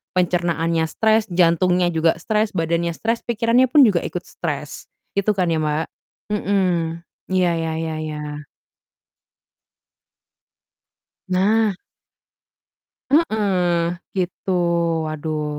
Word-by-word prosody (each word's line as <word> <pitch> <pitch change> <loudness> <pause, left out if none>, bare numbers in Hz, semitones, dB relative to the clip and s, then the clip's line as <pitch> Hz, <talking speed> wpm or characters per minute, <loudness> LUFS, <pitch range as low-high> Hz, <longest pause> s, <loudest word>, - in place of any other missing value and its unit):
Pencernaannya 170 -2 +1
stres, 220 0 +2
jantungnya 175 +1 +3
juga 165 0 +2
stres, 215 0 0
badannya 170 0 0
stres, 230 +1 -1
pikirannya 235 +2 +3
pun 285 +1 +7
juga 180 -5 +2
ikut 180 - -4
stres. 150 -3 -6 0.3
Gitu 200 +2 +2
kan 180 -3 +1
ya, 160 - +1
Mbak? 155 +1 0 0.5
Mhm. 180 -5 0 0.3
Iya, 185 -2 +2
ya 165 -1 -2
ya 160 -1 -3
ya. 150 -1 -6 2.8
Nah. 205 +3 +2 1.4
Heeh, 185 - +2 0.2
gitu, 185 +1 -2 0.5
waduh. 155 0 -3
175 Hz, 95 wpm, -21 LUFS, 165-205 Hz, 2.8 s, pun